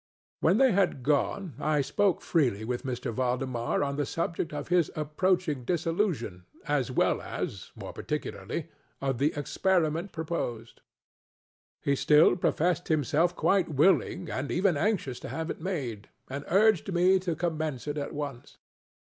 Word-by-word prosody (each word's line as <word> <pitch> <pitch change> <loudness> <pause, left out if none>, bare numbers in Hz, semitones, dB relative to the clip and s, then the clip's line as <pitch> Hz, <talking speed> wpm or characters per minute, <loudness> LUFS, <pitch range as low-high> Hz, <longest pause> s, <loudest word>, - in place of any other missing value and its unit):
When 180 +6 +3
they 265 0 +5
had 185 -9 +1
gone, 150 +5 0
I 150 -1 +2
spoke 195 +7 +1
freely 120 - +1
with 125 +2 -3
M. 120 -2 -3
Valdemar 125 0 -1
on 140 0 -2
the 145 - 0
subject 165 0 -2
of 145 +1 -5
his 175 -3 +3
approaching 155 -1 0
dissolution, 165 - -1 0.2
as 145 -4 +1
well 125 - +1
as, - - -5
more - - -8
particularly, - - -4 0.3
of 135 -3 -1
the 145 +3 +3
experiment 165 +3 0
proposed. 155 -9 -4 1.0
He 140 - +2
still 150 +5 +5
professed 175 -1 +1
himself 155 +3 +2
quite 195 -4 +2
willing 170 +3 +2
and 135 -2 -3
even 185 -1 +2
anxious 150 - 0
to - - -7
have 160 +1 -3
it - - -8
made, 130 - -4 0.2
and 140 +1 -5
urged 200 -1 +3
me 185 +2 +4
to 175 -3 -2
commence 160 -5 -2
it 150 0 -2
at 140 - -4
once. 140 -4 -6
155 Hz, 150 wpm, -28 LUFS, 135-180 Hz, 1.0 s, they